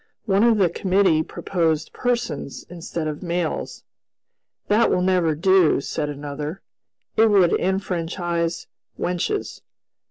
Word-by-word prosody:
One 200 -1 +3
of 230 -2 +4
the 190 -3 +4
committee 185 -2 +2
proposed 160 -2 -1
"persons" 235 - -2
instead 170 -2 -4
of 150 -1 -4
"males." 175 -2 -3 0.8
"That 215 +3 +4
will 180 - +1
never 180 -4 +2
do," 185 0 +4
said 150 +1 -3
another, 145 +4 -6 0.5
"it 225 - +5
would 190 -5 +4
enfranchise 175 -2 -2 0.3
wenches." 180 - -2
175 Hz, 115 wpm, -23 LUFS, 160-195 Hz, 0.8 s, it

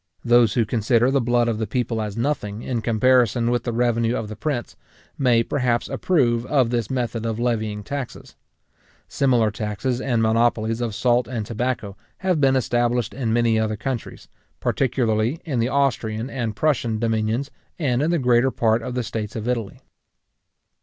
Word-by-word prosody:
Those 120 -2 +4
who 115 -3 +2
consider 115 +3 +2
the 135 -1 +2
blood 120 0 +2
of 115 -2 -1
the 110 - -2
people 120 -3 -1
as 105 0 -5
nothing, 115 -5 -2
in 120 -3 -2
comparison 120 0 +3
with 120 - -1
the 120 - -1
revenue 115 0 +1
of 110 - -4
the 110 - -6
prince, 125 +1 -3 0.4
may, 120 -4 +3
perhaps, 125 -2 0
approve 120 -10 +1
of 130 -5 +2
this 120 -4 -1
method 120 -3 -2
of 115 -1 -2
levying 110 -3 -1
taxes. 140 +2 -6 0.7
Similar 120 -6 +2
taxes 110 +4 -3
and 120 -4 +1
monopolies 115 0 +1
of 115 -4 -2
salt 120 +1 +2
and 115 -4 -4
tobacco 115 -3 -3 0.2
have 185 -5 0
been 135 -1 +4
established 120 -1 0
in 125 -4 -2
many 115 -1 +2
other 110 -1 -1
countries, 120 +2 -5 0.3
particularly 120 +1 0
in 140 -7 -1
the 115 +2 +1
Austrian 125 -4 0
and 115 -5 -3
Prussian 120 -7 0
dominions, 115 +4 -1 0.3
and 130 -6 0
in 155 - +1
the 170 - +2
greater 125 -2 +3
part 115 -2 +1
of 125 +2 -5
the 125 - -1
states 110 +1 -5
of 110 0 -4
Italy. 115 -5 -3
120 Hz, 170 wpm, -22 LUFS, 110-125 Hz, 0.7 s, Those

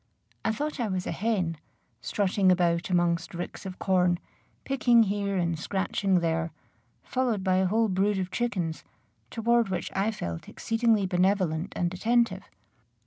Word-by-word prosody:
I - - +1
thought 295 +6 -3
I 235 - 0
was 185 -2 -2
a - - -2
hen, 190 -7 -1 0.4
strutting 195 -1 +2
about 175 -1 +1
amongst 175 -2 +1
ricks 175 +3 -6
of 185 - -7
corn, 180 -2 +2 0.5
picking 245 -4 +4
here 200 -1 -1
and 170 -3 0
scratching 190 0 0
there, 165 0 0 0.5
followed 245 -6 -1
by 185 -1 +2
a 190 0 +3
whole 225 +4 +2
brood 195 +1 +1
of 185 -1 -3
chickens, 185 -10 -2 0.5
toward 235 -1 +2
which 180 -3 -3
I 195 +3 +1
felt 85 - -5
exceedingly 225 -3 +1
benevolent 185 -2 +1
and 175 0 -1
attentive. 235 +5 +1
190 Hz, 145 wpm, -27 LUFS, 175-220 Hz, 0.5 s, picking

